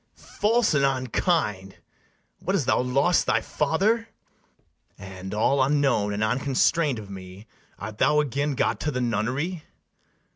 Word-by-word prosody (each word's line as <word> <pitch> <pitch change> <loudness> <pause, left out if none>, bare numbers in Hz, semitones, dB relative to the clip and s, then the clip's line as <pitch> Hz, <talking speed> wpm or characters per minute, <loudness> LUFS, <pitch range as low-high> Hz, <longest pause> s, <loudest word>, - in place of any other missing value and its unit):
False 225 -1 0
and 140 -2 +2
unkind! 130 - 0 0.6
what, - - -1
hast - - 0
thou - - +2
lost 140 +8 +2
thy - - +3
father? 205 +10 0 0.9
And, 95 -1 -9
all 125 +6 +2
unknown 135 -7 +2
and 105 +1 -1
unconstrain'd 135 +4 +1
of 105 -2 -9
me, 95 +2 -10 0.3
Art 105 +1 -8
thou 150 0 +4
again 145 0 -1
got - - 0
to 150 - -2
the 125 -4 -2
nunnery? 125 - -2
135 Hz, 135 wpm, -25 LUFS, 105-150 Hz, 0.9 s, thou